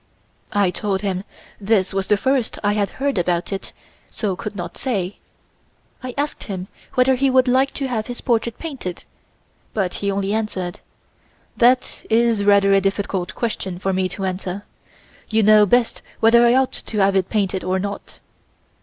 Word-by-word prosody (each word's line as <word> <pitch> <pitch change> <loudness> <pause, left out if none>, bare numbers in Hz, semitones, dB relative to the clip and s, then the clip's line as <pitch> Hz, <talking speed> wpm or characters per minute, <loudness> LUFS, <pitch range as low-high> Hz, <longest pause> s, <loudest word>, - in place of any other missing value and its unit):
I 200 -3 +2
told 195 0 -2
him 190 -2 -2 0.4
this 200 -2 +1
was 195 0 -1
the 210 - +3
first 260 +3 0
I 205 0 +2
had 205 -1 0
heard 275 -6 0
about 175 +2 0
it 195 - -5 0.4
so 200 -4 -2
could 210 +3 -6
not 175 -3 -6
say. 200 -7 -2 0.8
I 255 -1 -6
asked 290 +1 -2
him 190 -2 -5 0.3
whether 255 +1 +4
he 270 +1 +2
would 260 0 +4
like 260 +2 +3
to 275 - -2
have 225 -4 -2
his 245 -1 -5
portrait 235 -2 0
painted 265 - -6 0.7
but 190 -4 0
he 200 - 0
only 200 0 -1
answered: 190 -5 -3 0.8
"That 250 +1 +2
is 225 -2 +3
rather 200 -1 +5
a 195 - +5
difficult 195 -2 -2
question 195 -6 -3
for 190 +1 -1
me 185 0 0
to 190 +2 -4
answer. 185 +1 -4 0.6
You 220 0 +3
know 210 0 +6
best 240 +3 +2 0.2
whether 235 +1 +6
I 240 - +4
ought 265 0 +3
to 215 - -5
have 195 -1 +3
it 190 -1 +1
painted 195 -3 0
or 185 +1 0
not. 200 +1 -5
205 Hz, 170 wpm, -21 LUFS, 190-235 Hz, 0.8 s, know